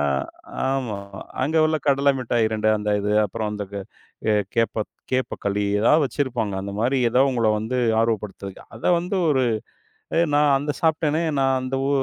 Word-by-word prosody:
ஆமா, 75 - +2 0.7
ஆமா. 125 -7 -2 0.5
அங்க 155 +4 0
உள்ள 155 0 +2
கடல 140 0 +4
மிட்டாய் 120 -2 +1
2 110 0 +1
அந்த 105 0 -2
இது. 105 +1 -1
அப்புறம் 105 +1 -3
அந்தக் 100 -1 -6 0.5
எ - - +4 0.2
கேப்ப 115 -2 +1 0.3
கேப்பக்களி 105 -5 -1 0.2
எதாவது 150 +8 +4
வெச்சிருப்பாங்க. 125 -7 -2
அந்த 100 0 -5
மாரி 130 +4 +2
எதோ 125 +2 +2
உங்கள 115 -3 +1
வந்து 110 +4 -3 0.2
ஆர்வப்படுத்துறதுக்கு. 105 -4 -3
அத 110 - -14
வந்து 180 +3 -2
ஒரு 135 -3 +3 0.8
"ஏய் 170 -2 +3
நான் 145 -1 +4
அந்த 145 +2 -3
சாப்ட்டனே, 160 0 +1 0.2
நான் 135 0 +3
அந்த 130 +1 -3
உ - - 0
120 Hz, 160 wpm, -23 LUFS, 105-140 Hz, 0.8 s, கடல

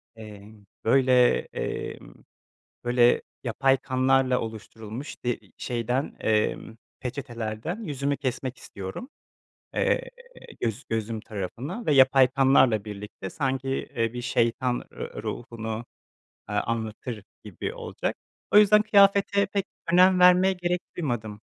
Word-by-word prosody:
Emm, 105 -1 -12 0.2
böyle, 125 0 +5 0.2
emm, - - -5 0.7
böyle, 120 0 +4 0.2
yapay 135 +3 +2
kanlarla 130 -1 +2
oluşturulmuş, 110 +3 -8
de 120 -1 -1 0.2
şeyden, 125 +3 -2
emm, 110 +1 0 0.2
peçetelerden 120 - -5
yüzümü 140 -3 -2
kesmek 130 -2 -3
istiyorum. 100 - -8 0.7
Eee, - - +1 0.5
göz 115 +3 -2
gözüm 110 0 -2
tarafına 120 - -6
ve 150 - +3
yapay 130 -1 +6
kanlarla 130 -5 +4
birlikte, 105 -2 -7
sanki, 135 -1 -2
eee, 115 -3 -2
bir 120 0 -5
şeytan 120 +1 0
r - - -7
ruhunu, 115 -1 -5 0.7
ııı, 105 0 +1
anlatır 110 -1 -4 0.2
gibi - - -5
olacak. - - -4 0.3
O 205 - +7
yüzden, 210 0 +6
kıyafete 200 -1 +4
pek 200 0 -2 0.3
önem 185 +1 +6
vermeye 180 +1 +6
gerek 180 -1 -1 0.2
duymadım. 110 -10 -3
125 Hz, 110 wpm, -26 LUFS, 110-145 Hz, 0.7 s, O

